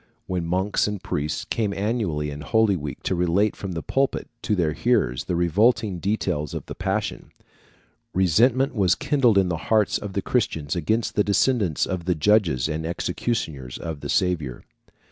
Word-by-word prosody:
When 90 -2 -2
monks 95 +5 +1
and 105 -3 -4
priests 75 +2 -2
came 105 -3 -1
annually 95 -9 -1
in 70 +1 -7
Holy 110 +4 +2
week 75 -4 -6
to - - 0
relate 90 +4 +1
from 95 -2 -5
the 80 - -4
pulpit 135 0 0
to 105 - 0
their 80 -5 +1
hearers 60 -3 +1
the 90 - -1
revolting 95 +3 +2
details 85 -7 -1
of - - -5
the - - -7
Passion, - - -3 0.8
resentment 120 - +3
was 95 -7 +3
kindled 125 -8 +2
in 95 -2 +3
the 85 - -1
hearts 110 -3 +3
of 100 -2 -6
the 100 - -2
Christians 80 - -1
against 110 +7 0
the 105 - +2
descendants 100 - +2
of 90 -3 -4
the 90 -1 +1
judges 80 - +2
and 80 0 -3
executioners 80 - -3
of 80 -3 -5
the 70 - -7
Saviour. 80 -10 0
95 Hz, 170 wpm, -24 LUFS, 80-105 Hz, 0.8 s, resentment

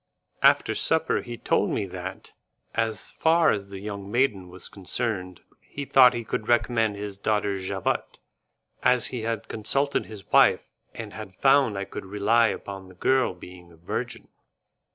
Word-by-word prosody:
After - - +4
supper - - +1
he 120 -1 -7
told - - +1
me - - -1
that, - - -8 0.4
as 115 -2 -2
far 165 +1 +3
as 100 -2 -3
the 100 - -7
young 100 -1 -6
maiden 115 -5 +1
was 90 0 -8
concerned, 95 -2 -3 0.2
he 140 - -7
thought 125 -2 +6
he 120 - -3
could 110 -1 -4
recommend 115 -2 +2
his 100 -1 -6
daughter 100 -2 0
Javotte, 95 +1 -2 0.6
as 125 -1 +3
he 125 - -3
had 115 -1 -3
consulted 135 +6 0
his 105 -3 -10
wife, - - +4 0.2
and - - -7
had 95 - -9
found 135 -3 +4
I 100 - -3
could 95 - -8
rely 105 +4 +3
upon 100 -2 -6
the 95 - -15
girl 130 +1 +2
being 90 -1 -13
a 85 - -18
virgin. 85 - -5
105 Hz, 160 wpm, -26 LUFS, 95-120 Hz, 0.6 s, thought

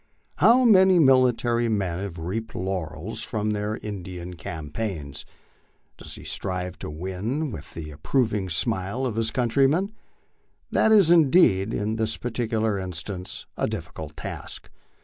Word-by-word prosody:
How 250 +3 +6
many 190 -4 +6
military 125 -5 +4
men 95 -5 -1
have 95 -3 -5
reaped 100 +7 -4
laurels 90 0 -3
from 105 -2 -2
their 105 +1 -2
In 105 -3 -6
dian 90 0 -7
campaigns? 80 -2 -5 0.7
Does - - -6
he - - -10
strive 90 -2 -3
to - - -5
win 95 - -3 0.2
the 75 -2 -6
approving 100 - 0
smile 95 +7 -1
of 120 -4 -2
his 115 0 +1
country 130 +2 +2
men? 185 +9 0 0.8
That 220 - +3
is 200 -6 +6
indeed, 135 - +5
in 110 +1 -1
this 110 -1 0
particular 110 -3 -1
instance, 90 +1 -5
a - - 0
difficult 75 -1 -6
task. - - -7
105 Hz, 135 wpm, -25 LUFS, 90-125 Hz, 0.8 s, How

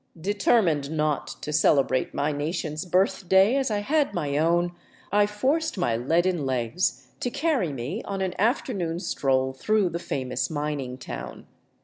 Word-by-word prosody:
Determined 180 -5 +2
not 150 -2 0 0.2
to 150 - -3
celebrate 135 -3 +3
my 145 +2 0
nation's 155 +2 -3
birthday 190 +4 +3
as 270 -2 +1
I 210 -1 0
had 295 +6 +1
my 145 -5 -1
own, 170 +3 +2 0.4
I 205 +1 +4
forced 275 +8 0
my 120 -11 +1
leaden 165 +7 +1
legs 130 +6 -1
to 245 - -1
carry 275 - 0
me 140 - -4
on 195 -1 -4
an 185 -1 -1
afternoon 200 - 0
stroll 130 -5 0
through 205 +7 +1
the 170 0 -4
famous 130 -5 -2
mining 145 -4 -3
town. 125 - -8
170 Hz, 145 wpm, -26 LUFS, 145-205 Hz, 0.4 s, I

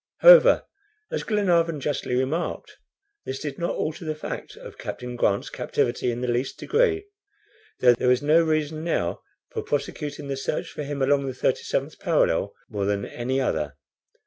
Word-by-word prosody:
However, - - +8 0.5
as - - -1
Glenarvan 170 -7 +1
justly 140 -3 -2
remarked, 135 +7 -2 0.4
this 130 - -4
did 145 -2 -5
not 170 - -1
alter 160 +3 -3
the 155 -1 -3
fact 155 - -6
of - - -12
Captain 125 0 -6
Grant's 100 -4 0
captivity 125 +1 -1
in 120 0 -3
the 125 - -1
least 120 +2 -1
degree, 425 -3 +1 0.8
though 125 -1 +7
there 120 - -1
was 125 +2 +3
no 155 +3 +5
reason 155 -1 0
now 125 - -1 0.3
for - - -3
prosecuting 145 0 -3
the 135 -1 -3
search 135 +3 -3
for - - -6
him 140 -1 -2
along 140 0 +2
the 130 - -3
37th 125 - -1
parallel, - - +2 0.2
more 100 -2 -3
than 100 0 0
any 130 +3 -2
other. 75 - -1
140 Hz, 165 wpm, -25 LUFS, 125-160 Hz, 0.8 s, However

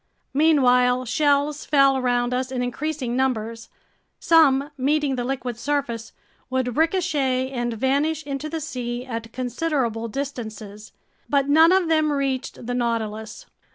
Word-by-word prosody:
Meanwhile 255 -4 +3
shells 290 +3 +1
fell 275 -2 +4
around 245 -1 0
us 255 +1 -2
in 250 -1 -2
increasing 255 0 -3
numbers. 230 -3 -2 0.5
Some, 290 -3 +4
meeting 285 +1 +1
the 245 - -2
liquid 245 -2 -4
surface, 260 -6 -2 0.4
would 255 -2 -1
ricochet 300 -7 +1
and 240 -2 -2
vanish 285 +6 0
into 280 +1 -4
the 325 0 -4
sea 245 -4 -4
at 230 -2 -6
considerable 250 -3 -2
distances. 220 -5 -6 0.4
But 280 -1 +1
none 320 +3 +6
of 375 -2 +3
them 310 -2 +2
reached 270 -3 -2
the 245 - -3
Nautilus. 225 -3 -3
260 Hz, 130 wpm, -23 LUFS, 240-290 Hz, 0.5 s, none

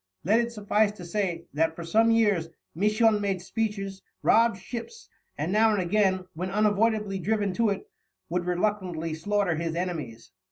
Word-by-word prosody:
Let 215 +7 +3
it 235 0 -1
suffice 210 -1 +1
to 180 -4 -10
say 175 -3 -2
that 160 +2 +1
for 170 - -7
some 220 +7 +3
years 205 -8 +2 0.2
Misson 210 +4 +3
made 195 -2 -1
speeches, 195 0 -3 0.2
robbed 230 -3 +4
ships, 245 - -8 0.3
and 155 +5 -2
now 220 +2 +4
and 205 - +1
again, 185 0 +1
when 180 +4 -4
unavoidably 210 -1 +1
driven 205 +1 0
to 230 +2 +2
it, 200 - -3 0.4
would 175 +1 -2
reluctantly 180 -3 -1
slaughter 185 +1 0
his 165 0 -2
enemies. 155 -11 -4
200 Hz, 160 wpm, -27 LUFS, 175-215 Hz, 0.4 s, robbed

